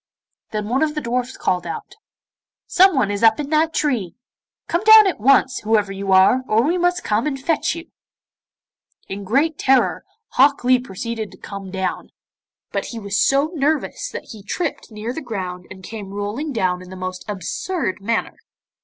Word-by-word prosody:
Then 210 -2 -3
one 250 +4 0
of 310 -1 +1
the 300 - -2
dwarfs 250 +1 -2
called 180 -1 -1
out, 165 - -6 0.7
'Someone 310 - +4
is 205 - -3
up 225 +2 +5
in 290 0 -4
that 315 +1 +3
tree. 245 - -1 0.5
Come 345 +4 0
down 435 0 +9
at 375 - 0
once, 260 +2 +4
whoever 210 -2 +1
you 195 0 -3
are, 190 +7 +5
or 220 +2 +3
we 325 +6 +1
must 355 0 +1
come 220 +6 0
and 270 -2 -2
fetch 315 +3 0
you.' 335 0 -10 1.2
In 200 +1 -6
great 285 +10 +1
terror, 265 -1 +2 0.3
Hok 280 +1 +3
Lee 250 0 +4
proceeded 225 -1 -5
to - - -14
come 200 -1 -8
down; 190 0 -3 0.6
but - - -2
he 235 - -7
was 200 -1 0
so 280 +4 +2
nervous 315 - -1
that - - -8
he 215 - -10
tripped 300 - -4
near 215 +3 -5
the 320 - -5
ground 185 - -5
and 190 0 -11
came 205 -1 -8
rolling 210 +10 -3
down 185 -7 0
in 185 - -12
the 185 - -9
most 185 0 -5
absurd 205 - -3
manner. 230 +3 -1
230 Hz, 180 wpm, -21 LUFS, 200-295 Hz, 1.2 s, down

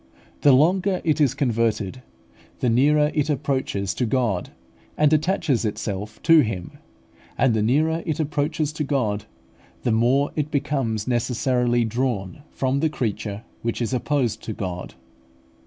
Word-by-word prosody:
The 145 - +6
longer 180 +7 +3
it 155 -2 +1
is 135 -3 +3
converted, 115 -4 0 0.6
the 125 - +1
nearer 150 +5 +3
it 150 -1 0
approaches 130 -9 -1
to 125 - -1
God, 110 -6 0 0.5
and 150 0 +4
attaches 155 -5 +1
itself 105 -1 -4
to 165 -1 +7
Him; 105 -10 -2 0.6
and 130 -4 +3
the 110 - +1
nearer 155 +9 +2
it 155 -1 -1
approaches 150 0 -1
to 155 - -2
God, 120 -8 -1 0.6
the 120 - +1
more 125 +6 +2
it 150 -1 -1
becomes 130 -7 -1
necessarily 120 0 +1
drawn 115 -3 -2
from 135 +1 -1
the 160 +2 +2
creature, 110 -5 -3 0.2
which 115 0 -2
is 120 +1 -2
opposed 125 -4 0
to 110 - -3
God. 90 -6 -5
130 Hz, 140 wpm, -23 LUFS, 110-150 Hz, 0.6 s, to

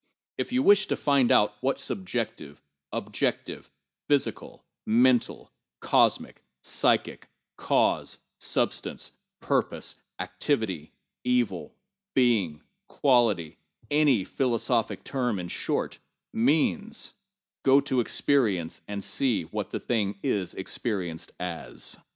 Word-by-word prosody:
If - - -2
you 255 +1 +2
wish 205 -3 +6
to - - 0
find 140 -4 +3
out 105 0 +5
what 135 +1 +1
subjective, 120 - -4 0.3
objective, - - -2 0.4
physical, 145 -2 -1 0.2
mental, 120 +2 +2 0.3
cosmic, - - +2 0.2
psychic, - - +1 0.3
cause, - - +1 0.2
substance, - - -1 0.3
purpose, - - -1 0.3
activity, 100 - -2 0.3
evil, 120 -7 0 0.4
being, 105 - +2 0.2
quan 120 -6 +4 0.6
tityŌĆöany 145 -9 +4
philosophic 120 -2 0
term, 125 -6 -1
in 90 -1 -5
shortŌĆö - - -2 0.3
means, 160 - +1 0.5
go 135 +1 +6
to 130 -2 0
experience 110 - +1
and 100 -1 -4
see 125 -5 +1
what 80 - -5
it 105 -4 -1
is 95 -4 -1
experienced 95 -4 -3
as. 90 -2 -5
120 Hz, 100 wpm, -27 LUFS, 100-135 Hz, 0.6 s, wish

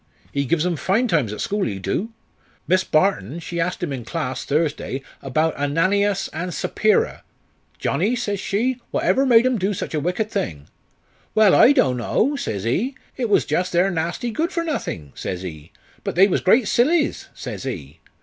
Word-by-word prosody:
He 140 0 0
gives 165 +3 +1
'em 175 -2 0
fine 195 - +1
times 150 - +1
at 105 - -5
school, 205 0 -1
he 100 - -2
do. 100 - -2 0.6
Miss 185 +3 +3
Barton, 155 - +1
she 170 0 -5
ast 180 +2 -1
him 150 -5 -2
in 125 -3 -5
class, 130 -3 -3
Thursday, 145 -3 -1 0.2
'bout 155 +4 0
Ananias 185 +8 +1
and 175 +4 -3
Sappira. 215 - +1 0.6
'Johnnie,' 235 +4 0
says 205 -4 -2
she, 240 +7 -1
'whatever 270 +1 +2
made 235 -1 +6
'em 255 -3 +2
do 195 +2 0
sich - - -5
a 155 - +1
wicked 180 +8 -1
thing?' 75 - -3 0.7
'Well, 215 -3 +6
I 260 - +7
do'n' 135 - +3
know,' 240 - +1
says 100 - -3
he; 210 - 0 0.2
'it 245 -4 -2
was 205 - +3
jus' 180 0 0
their 180 +3 +2
nassty 175 +8 -2
good 325 - -1
for 335 - -1
nothink,' 85 - -4
says 90 0 -4
he; 80 -5 -8 0.3
'but - - -3
they 190 +3 +7
was 190 - 0
great 215 +4 +4
sillies,' 300 +9 +2
says - - -6
he. 85 - -6
180 Hz, 180 wpm, -22 LUFS, 140-220 Hz, 0.7 s, I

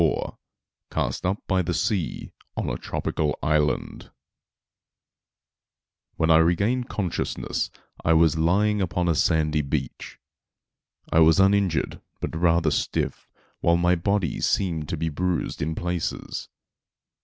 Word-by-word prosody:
* 80 - +3 0.7
*Cast - - -2
up 95 +3 -2
by 95 -1 +1
the 90 0 -2
Sea 100 -7 -2 0.2
on - - -1
a - - -2
Tropical 75 -1 -2
Island.* 75 0 0 2.1
When 80 0 +2
I 80 - +7
regained 100 +10 +2
consciousness 95 -5 -2 0.3
I 80 - +4
was 80 -2 +4
lying 100 +6 +2
upon 90 -1 0
a 85 - +3
sandy 75 -1 +2
beach. 70 - -4 0.9
I 80 - +4
was 80 +2 +6
uninjured, 95 -3 +2 0.2
but - - -4
rather 85 -1 +3
stiff, - - -2 0.3
while 85 0 +3
my 90 +1 +3
body 90 0 0
seemed 80 -6 0
to 85 - -2
be 80 +1 -1
bruised 90 +3 -2
in 80 +2 -1
places. 90 -1 -3
85 Hz, 125 wpm, -25 LUFS, 80-95 Hz, 2.1 s, I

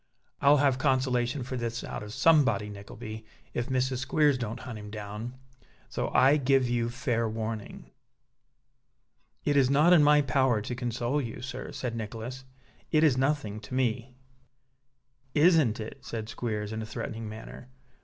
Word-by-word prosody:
"I'll 145 +1 +6
have 135 -2 +2
consolation 130 -1 +1
for 130 +1 -5
this 120 -1 -3
out - - -5
of 105 0 -8
somebody, 130 -7 +3
Nickleby, 110 +2 -8 0.3
if 120 0 -2
Mrs. 130 0 0
Squeers 145 +2 +3
don't 115 -3 -4
hunt 115 -4 -7
him 105 0 -9
down. 105 +3 -6 0.5
So - - -2
I 140 +3 +5
give 135 -2 +3
you 120 -1 0
fair 120 -2 -1
warning." 110 -1 -5 1.5
"It 145 - +2
is 135 -2 +4
not 150 +6 +5
in 170 - +7
my 150 0 +5
power 130 -3 +2
to 105 +4 -4
console 120 +3 -1
you, 120 0 -6
sir," 130 - -6
said 125 -2 -4
Nicholas. 115 +4 -6 0.4
"It 155 -1 +3
is 150 -5 +5
nothing 130 -6 0
to 125 - -7
me." 125 0 -1 1.2
"Isn't 155 -8 +4
it?" 110 0 -7
said 110 -1 -5
Squeers, 110 -2 -3
in 110 - -3
a - - -4
threatening 110 0 -5
manner. 110 +3 -10
125 Hz, 155 wpm, -28 LUFS, 110-135 Hz, 1.5 s, in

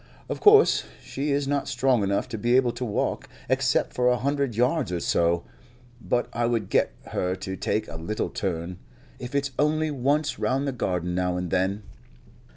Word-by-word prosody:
Of - - -3
course 425 +1 +6 0.2
she 140 +3 -3
is 140 0 0
not 140 0 0
strong 130 -3 +2
enough 100 +3 0
to 115 - -4
be 120 +3 +2
able 130 -2 +4
to 120 +2 -6
walk, 110 -4 -2 0.2
except - - +1
for 125 0 +1
a 125 - +2
hundred 140 -2 -1
yards 125 - +1
or 90 - -1
so, 85 0 +1 0.6
but 120 +1 0
I 120 0 0
would 115 -5 -1
get - - +3 0.2
her 90 0 -1
to 95 0 -5
take 105 +3 -1
a 80 - -7
little 105 +7 -3
turn, 90 -1 -3 0.4
if 125 +3 -7
it's 140 -1 0
only 155 +1 +2
once 145 +3 0
round 135 +2 0
the - - 0
garden 90 -7 -2
now 90 0 0
and 90 -2 -4
then." 95 +3 0
120 Hz, 185 wpm, -25 LUFS, 95-140 Hz, 0.6 s, course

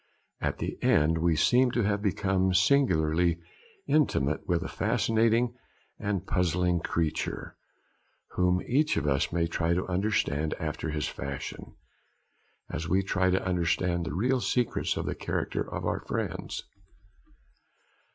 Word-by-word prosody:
At - - -1
the - - -5
end 80 +2 +3
we 85 0 +2
seem 125 +9 +4
to 120 - +1
have 100 0 0
become 95 -1 +1
singularly 85 - +3 0.5
intimate 75 - +1
with 85 -1 +1
a - - -4
fascinating 115 +2 +1 0.5
and 100 -3 -2
puzzling 90 -1 +1
creature, 80 -1 -2 0.8
whom 90 0 +1
each 150 - +1
of 80 - 0
us 70 -2 +1
may 85 0 +1
try 85 0 0
to 90 - -1
understand 90 -6 0
after 80 - -4
his 75 0 -2
fashion, 70 -1 -6 0.9
as 80 +1 -4
we 95 +2 +2
try 95 -1 +1
to 95 +1 +1
understand 90 -1 0
the 80 - -4
real 125 +6 +1
secrets 125 -1 0
of - - -2
the - - -1
character - - -2
of - - -4
our - - 0
friends. - - -4
90 Hz, 135 wpm, -28 LUFS, 80-105 Hz, 0.9 s, seem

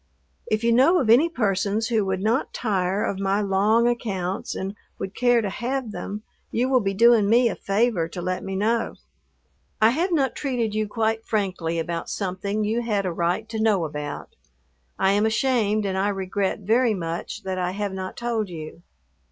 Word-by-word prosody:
If 215 +1 0
you 235 - +3
know 275 +10 +5
of 230 -7 +2
any 285 +9 +6
persons 210 - 0
who 225 -3 +2
would 190 -1 -1
not 230 +6 0
tire 195 -3 0
of 195 - -2
my 195 +1 +1
long 210 +4 +3
accounts 195 -6 -2
and 195 +1 -4 0.2
would 190 - -5
care 245 -1 +3
to 200 - -1
have 250 +1 -3
them, 205 +3 -6 0.3
you 250 +3 0
will 260 -1 +4
be 195 -3 -1
doing 230 -1 +5
me 235 +1 +5
a - - -3
favor 200 -4 +1
to 180 - -8
let 185 +1 -2
me 195 0 -4
know. 225 +4 0 0.8
I 220 +1 +5
have 340 +8 0
not 280 -6 +1
treated 245 -6 -1
you 215 0 0
quite 225 +1 -1
frankly 185 -7 -1
about 165 +1 -3
something 200 +2 -2
you 220 +3 0
had 210 -4 -1
a 180 - -1
right 175 +6 -1
to 220 -1 -3
know 205 -6 +2
about. 150 -1 -6 0.6
I 190 0 +3
am 205 +2 +3
ashamed 220 -3 +1
and 190 -1 -1
I 190 +1 +1
regret 195 +1 -2
very 225 +3 +2
much 170 +4 -5
that 190 -1 -3
I 180 0 0
have 200 +1 -3
not 190 0 -6
told 230 -4 -2
you. 165 0 -8
210 Hz, 190 wpm, -24 LUFS, 190-230 Hz, 0.8 s, any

